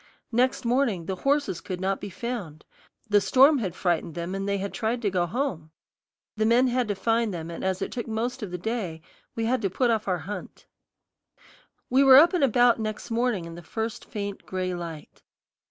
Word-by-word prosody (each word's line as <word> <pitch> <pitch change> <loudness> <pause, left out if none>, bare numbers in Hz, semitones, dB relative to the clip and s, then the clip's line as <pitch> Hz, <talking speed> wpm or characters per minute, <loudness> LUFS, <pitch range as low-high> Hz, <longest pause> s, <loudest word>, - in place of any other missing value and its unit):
Next 250 +2 +1
morning 235 -8 +1
the 190 +2 -3
horses 280 - 0
could 185 -1 -5
not 190 +1 -1
be 205 - -5
found; 190 -7 -6 0.4
the 205 -1 +4
storm 270 +6 +5
had 185 -6 -3
frightened 170 -3 -1
them, 170 +2 -4
and 195 +1 -3
they 200 - +1
had 200 +1 -4
tried 230 +1 -1
to 205 - +1
go 180 -2 +1
home. 180 - -3 0.7
The 215 0 +1
men 245 +3 +4
had 245 -1 0
to 205 - -1
find 225 +2 +1
them, 170 -2 -5
and 165 - -7
as 190 0 -1
it - - -5
took 240 -1 -4
most 240 +3 -2
of 210 - -4
the 180 - -4
day, 180 -5 -4 0.3
we 225 - -1
had 250 +1 +1
to 195 - 0
put 240 +6 +1
off 220 -2 -1
our 185 -2 +1
hunt. 200 +5 -8 1.2
We 265 +3 +4
were 265 -1 +9
up 330 +5 +7
and 350 -5 +2
about 245 -2 +4
next 215 +1 -4
morning 230 -6 0
in 170 - -8
the 170 - -9
first 220 +6 -4
faint 200 -2 -5
gray 185 -1 -2
light. 165 -3 -8
215 Hz, 205 wpm, -26 LUFS, 185-245 Hz, 1.2 s, were